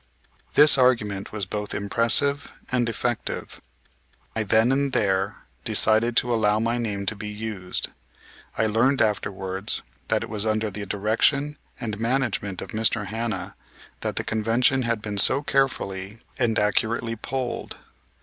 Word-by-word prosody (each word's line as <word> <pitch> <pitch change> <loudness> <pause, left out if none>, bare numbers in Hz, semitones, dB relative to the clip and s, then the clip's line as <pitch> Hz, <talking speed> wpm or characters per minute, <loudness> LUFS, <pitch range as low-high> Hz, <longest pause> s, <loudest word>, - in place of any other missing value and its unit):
This 150 -2 +7
argument 105 -6 +2
was 105 -3 -3
both 105 +2 -4
impressive 115 +7 +1 0.2
and 120 -2 +1
effective. 120 0 -3 0.7
I 110 - 0
then 110 +4 +3
and 140 0 +1
there 95 -1 0 0.2
decided 115 +2 +3
to 120 0 +3
allow 105 -2 +2
my 115 +2 0
name 100 -4 -3
to 110 - +1
be 105 +1 -7
used. 105 -3 -4 0.7
I 110 - +2
learned 120 +6 +2
afterwards 95 -2 -1 0.2
that - - +1
it - - -6
was 105 -2 +3
under 110 -1 0
the 100 +1 -5
direction 115 +9 +1 0.2
and 110 -4 -4
management 115 -5 -1
of - - -10
Mr. 110 -1 +1
Hanna 110 -3 -4 0.4
that - - -3
the - - -1
Convention 115 +4 +2
had 115 -3 -1
been 105 -2 -2
so 135 +7 +4
carefully 110 -7 -1 0.2
and 115 -3 +1
accurately 115 +2 0
polled. 125 +2 -4
110 Hz, 140 wpm, -24 LUFS, 105-120 Hz, 0.7 s, This